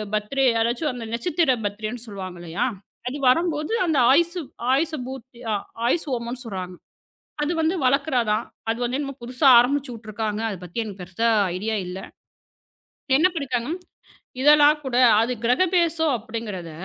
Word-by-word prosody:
Birthday. 265 +6 0 0.2
அதாச்சும் 240 +6 0
அந்த 240 -2 -6
நட்சத்திர 295 +3 +1
பர்த்டேன்னு 215 +4 -4
சொல்லுவாங்க 190 -4 -7
இல்லையா? 175 +8 -2 0.4
அது 275 - -5
வரம்போது, 310 - +1
அந்த 315 - +1
ஆயுஷ் 340 +5 +3 0.4
ஆயுஷ் 310 +4 +1
பூட்தி 260 -2 -10 0.5
ஆயுஷ்ஹோமம்ன்னு 250 -4 -2
சொல்றாங்க. 185 -4 -6 0.7
அது 295 +3 0
வந்து 320 +3 +1
வளக்குறதான். 250 -5 +1 0.3
அது 230 - -1
வந்து 250 +3 -1
என்னமோ 275 -1 -4
புதுசா 250 +4 0
ஆரம்பிச்சு 265 +2 +2
விட்டுருக்காங்க. 215 -1 -4
அது 195 - -5
பத்தி 180 +6 -4
எனக்குப் 200 -4 -7
பெருசா 190 +6 -1 0.3
ஐடியா 220 +4 -2
இல்ல. 180 +1 -6 1.2
என்ன 340 - +5
பண்ணிட்டாங்க, 255 -5 -2 0.7
இதெல்லாம் 295 +1 +6
கூட 250 -2 -2 0.3
அது 240 +2 0
கிரகபிரேசம் 330 +1 +2
அப்படிங்கறத 215 -6 -6
245 Hz, 130 wpm, -23 LUFS, 220-295 Hz, 1.2 s, இதெல்லாம்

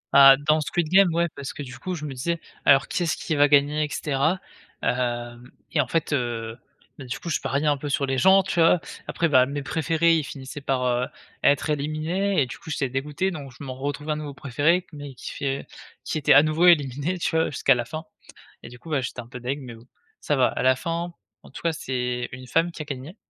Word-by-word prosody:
Ah, 135 -1 +9
dans 155 +2 +2
Squid 155 +2 -1
Game, 190 -1 +5
ouais, 170 0 +2
parce 140 -2 -6
que 145 - -6
du 130 -1 -9
coup 185 -1 -4
je 150 - -6
me 140 - -5
disais: 170 +6 -2 0.3
«Alors, 135 0 +5
qui - - -2
est-ce 165 - 0
qui - - -3
va 145 0 +5
gagner?» 145 +1 +3
et - - -7
cetera, 150 +6 0 0.4
hem 120 -1 -2 0.2
et 150 - +3
en 130 - -3
fait, 165 0 -1
heu, 115 -4 -2 0.4
beh, 135 - -8
du 125 - -4
coup, 170 - -6
je - - 0
pariais 140 +3 -1
un 145 -1 +3
peu 145 +1 -5
sur 140 0 +1
les 135 -1 -1
gens, 190 +6 +6
tu 175 -2 -2
vois, 165 +1 +5 0.3
après, 170 - 0
bah, 130 -4 +5
mes 140 0 -4
préférés, 165 +2 +2
ils 155 - 0
finissaient 140 +1 -8
par, 130 -2 -1
heu, 125 0 +1 0.4
être 145 +2 +3
éliminés 155 +7 -1
et - - -2
du 120 - -9
coup, - - -12
j'étais 140 -3 -1
dégoûté, 150 +8 -2
donc 140 -5 -7
je - - -10
m'en 130 -2 -5
retrouvais 145 +3 -4
un 150 - -1
nouveau 145 -2 -6
préféré 155 +7 +1
mais 145 -3 -8
qui - - -7
fait 135 0 -3 0.4
qui 155 - -2
était 140 - +5
à 145 - +8
nouveau 155 +3 +3
éliminé, 145 +1 +3
tu 160 - -1
vois, 160 - +3
jusqu'à 135 -1 +3
la 120 - -1
fin 155 +6 -6 0.6
et - - -9
du 125 0 -13
coup, 165 - -12
bah, 150 -3 +1
j'étais 125 -1 -5
un 115 - -14
peu 125 +1 -9
dég 135 +4 -3
mais 125 -3 -9
bon, 115 +2 -17 0.3
ça 150 - 0
va, 130 - +4
à - - -3
la 130 0 +4
fin, 170 +4 -3 0.3
en - - -15
tout - - -9
cas, 165 - +1
c'est 125 -4 -3
une 130 0 -9
femme 165 +4 +1
qui - - -7
a 155 - -5
gagné, 140 +5 -7
145 Hz, 245 wpm, -24 LUFS, 130-160 Hz, 0.6 s, Ah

